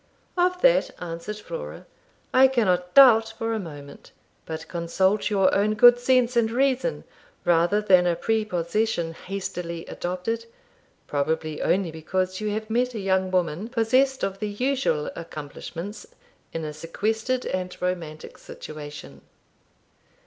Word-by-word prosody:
'Of 360 0 +1
that,' - - +4
answered 170 +4 -5
Flora, - - -7 0.5
'I 260 +1 +7
cannot 185 -9 0
doubt 225 -5 +7
for 225 0 -2
a 220 - -1
moment. 145 -6 -10 0.4
But 160 0 -6
consult 190 +5 0
your 195 -3 +3
own 210 +2 +2
good 245 +2 +7
sense 250 -1 +2
and 230 -2 +3
reason 265 - 0 0.4
rather 175 +4 +3
than 185 -3 +5
a 175 - +2
prepossession 210 -3 -1
hastily 180 -2 -5
adopted, 225 +6 -4 0.6
probably 155 +1 -2
only 185 -2 +1
because 185 +4 -2
you 215 - -1
have 215 +1 -3
met 245 +2 0
a - - -3
young 190 -1 +1
woman 180 +1 -1
possessed 255 +3 +2
of 195 0 -2
the 210 - -2
usual 250 - 0
accomplishments 170 - -8 0.4
in 165 -1 -4
a 150 - -5
sequestered 220 +10 -2
and 185 -1 -4
romantic 170 -4 -4
situation. 145 - -10
195 Hz, 130 wpm, -25 LUFS, 170-230 Hz, 0.6 s, I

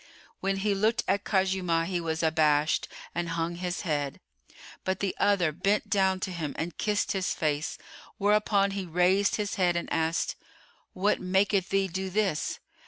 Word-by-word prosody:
When 195 0 0
he 200 +1 +1
looked 215 +4 +1
at 200 +1 +1
Khuzaymah, 185 -4 +1
he 175 0 -2
was 160 0 -2
abashed 155 -1 +2 0.3
and 175 0 -2
hung 165 +1 -2
his 180 0 -3
head; 145 -5 -2 0.6
but 190 0 -1
the 195 -2 -1
other 185 -6 +3
bent 200 +6 0
down 190 -2 +3
to 185 - -2
him 160 -5 -4
and 170 +1 -3
kissed 210 -1 0
his 190 -3 -1
face; 150 -1 -1 0.4
whereupon 205 -1 +3
he 195 -2 -4
raised 180 +4 +3
his 210 0 -2
head 175 -1 +3
and 170 - -2
asked, 160 +1 0 0.6
"What 200 +3 +1
maketh 190 +1 +2
thee 195 0 +2
do 190 +1 -3
this?" 195 -5 0
185 Hz, 165 wpm, -28 LUFS, 165-200 Hz, 0.6 s, other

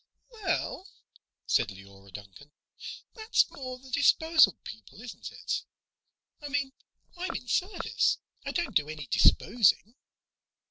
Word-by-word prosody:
"Well," 405 -3 -2 0.6
said - - +2
Leora 95 0 -14
Duncan, 100 +8 -12 0.6
"that's 440 0 +2
more 255 -6 -7
the 260 +1 -15
disposal 310 - +5
people, 110 - -11
isn't 240 0 -8
it? - - -3 0.8
I 290 - -6
mean, 280 -1 -1 0.4
I'm 355 -1 -3
in 250 - -5
service. 370 - +1 0.3
I - - -4
don't 345 -9 -2
do 150 -1 +2
any 155 -2 -6
disposing." 225 - +3
250 Hz, 120 wpm, -29 LUFS, -, 0.8 s, disposal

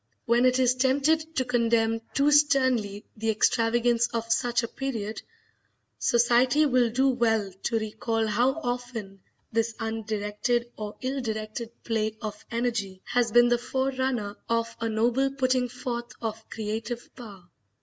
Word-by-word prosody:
When 235 +2 +3
it 255 0 +3
is 255 -1 +4
tempted 285 +5 +1
to 260 - +1
condemn 230 -2 +1
too 285 +1 +4
sternly 260 -8 +3
the 225 0 -2
extravagance 235 +2 +2
of 230 -1 -1
such 245 0 0
a - - -1
period, 225 -5 -4 0.8
society 245 +5 +4
will 250 -4 +3
do 260 +4 +2
well 225 -6 +1
to 230 - +1
recall 225 +1 -1
how 235 +5 +2
often 245 -6 -4 0.3
this 225 0 0
undirected 225 +1 -2
or 210 -1 -6
ill 265 +1 -2
directed 220 0 -4
play 220 -1 -1
of 210 -1 -6
energy 230 -6 -2
has 240 -2 +1
been 240 +1 +6
the 240 0 +2
forerunner 260 -5 -1
of 230 0 0
a 230 0 -1
noble 240 +5 +2
putting 255 -2 +1
forth 240 -1 -5
of 220 -1 -5
creative 225 +2 -5
power. 200 -8 -11
235 Hz, 140 wpm, -27 LUFS, 220-250 Hz, 0.8 s, been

